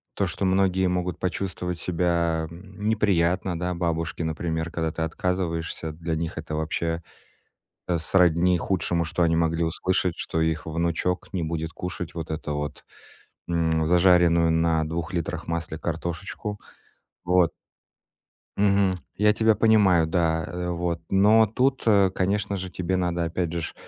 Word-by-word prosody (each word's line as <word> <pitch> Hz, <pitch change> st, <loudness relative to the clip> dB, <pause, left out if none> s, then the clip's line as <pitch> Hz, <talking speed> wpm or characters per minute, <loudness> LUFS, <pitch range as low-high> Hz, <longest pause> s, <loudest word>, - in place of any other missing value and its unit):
то, 100 Hz, -, 0 dB
что 95 Hz, +2 st, -2 dB
многие 95 Hz, 0 st, +2 dB
могут 90 Hz, 0 st, -2 dB
почувствовать 90 Hz, -1 st, -3 dB
себя, 85 Hz, -2 st, 0 dB
м, 95 Hz, +4 st, -7 dB
неприятно, 90 Hz, -4 st, +1 dB
да, 90 Hz, 0 st, -1 dB
бабушки, 85 Hz, -1 st, -2 dB
например, 80 Hz, +1 st, -2 dB
когда 80 Hz, -2 st, -2 dB
ты 80 Hz, -, -5 dB
отказываешься, 85 Hz, -2 st, -2 dB
для 80 Hz, 0 st, -3 dB
них 80 Hz, +1 st, -4 dB
это 80 Hz, -1 st, -4 dB
вообще, 80 Hz, +2 st, -2 dB, 0.9 s
э, 85 Hz, -2 st, +1 dB
сродни 90 Hz, +1 st, +3 dB
худшему, 85 Hz, -1 st, 0 dB
что 85 Hz, +2 st, -1 dB
они 80 Hz, -1 st, +3 dB
могли 85 Hz, 0 st, +1 dB
услышать, 90 Hz, +1 st, 0 dB
что 80 Hz, -, -2 dB
их 80 Hz, -1 st, 0 dB
внучок 85 Hz, +3 st, -1 dB
не 90 Hz, -3 st, -2 dB
будет 80 Hz, 0 st, -3 dB
кушать 90 Hz, -2 st, -6 dB
вот 80 Hz, -2 st, -5 dB
эту 75 Hz, -1 st, -3 dB
вот, 75 Hz, 0 st, -5 dB, 0.6 s
м, 80 Hz, -2 st, +1 dB
зажаренную 85 Hz, -1 st, +4 dB
на 80 Hz, -1 st, +2 dB
2 85 Hz, +3 st, -4 dB
литрах 85 Hz, 0 st, -3 dB
масле 85 Hz, -1 st, -3 dB
картошечку. 85 Hz, +6 st, -4 dB, 0.7 s
Вот. 90 Hz, -1 st, +3 dB, 1.1 s
Мгм. 100 Hz, -1 st, +3 dB, 0.2 s
Я 105 Hz, +1 st, +4 dB
тебя 110 Hz, 0 st, +3 dB
понимаю, 100 Hz, -6 st, +4 dB
да, 80 Hz, -1 st, +1 dB
э, 90 Hz, 0 st, -4 dB
вот. 85 Hz, -1 st, -2 dB
Но 105 Hz, +3 st, +5 dB
тут, 130 Hz, +5 st, +1 dB
э, 100 Hz, -4 st, +5 dB
конечно 100 Hz, +2 st, -1 dB
же, 95 Hz, -1 st, -5 dB
тебе 90 Hz, +1 st, -2 dB
надо 85 Hz, -1 st, 0 dB
опять 85 Hz, 0 st, -2 dB
же 85 Hz, -, -2 dB
ж -, -, -5 dB
85 Hz, 150 wpm, -25 LUFS, 80-95 Hz, 1.1 s, Но